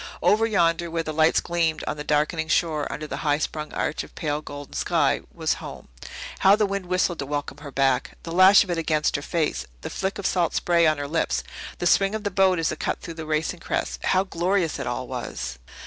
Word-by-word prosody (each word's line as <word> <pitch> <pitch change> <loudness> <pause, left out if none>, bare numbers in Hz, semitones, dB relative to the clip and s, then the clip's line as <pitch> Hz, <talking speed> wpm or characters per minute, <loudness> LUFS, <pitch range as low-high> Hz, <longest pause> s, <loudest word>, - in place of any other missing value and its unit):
Over 220 +2 +4
yonder, 170 -5 +2
where 165 0 -2
the 155 - -4
lights 155 +1 +4
gleamed 170 -2 0
on - - -2
the 150 - -6
darkening 155 +2 0
shore 155 -2 +1
under 155 - -5
the - - -5
high 145 -2 +2
sprung 155 0 -4
arch 150 - -2
of - - -15
pale 150 -1 -2
golden 145 -1 -9
sky, - - +1
was - - 0
home. - - -9 0.5
How 195 +1 +6
the 210 0 +2
wind 200 -2 -3
whistled 180 -2 0
to 140 - -2
welcome 145 0 -4
her 145 -1 -8
back! 135 -1 0
The 165 - -6
lash 185 +3 +7
of 190 - -5
it 170 - 0
against 155 -2 +1
her 140 - -1
face 160 0 -1
the - - -6
flick 190 0 -2
of 200 - -6
salt 175 -3 +1
spray 170 -2 +3
on 155 -1 +2
her 145 0 -4
lips 65 - 0 0.3
the - - -3
swing 195 +3 +3
of 220 - -4
the 205 - -1
boat 190 -1 +3
as 165 -1 0
it - - -6
cut - - -2
through 170 - -7
the 160 -1 -7
racing 155 +3 -1
crests - - -3
how 185 0 +3
glorious 180 -2 0
it - - -3
all - - -3
was! - - -5
165 Hz, 230 wpm, -24 LUFS, 150-185 Hz, 0.5 s, lash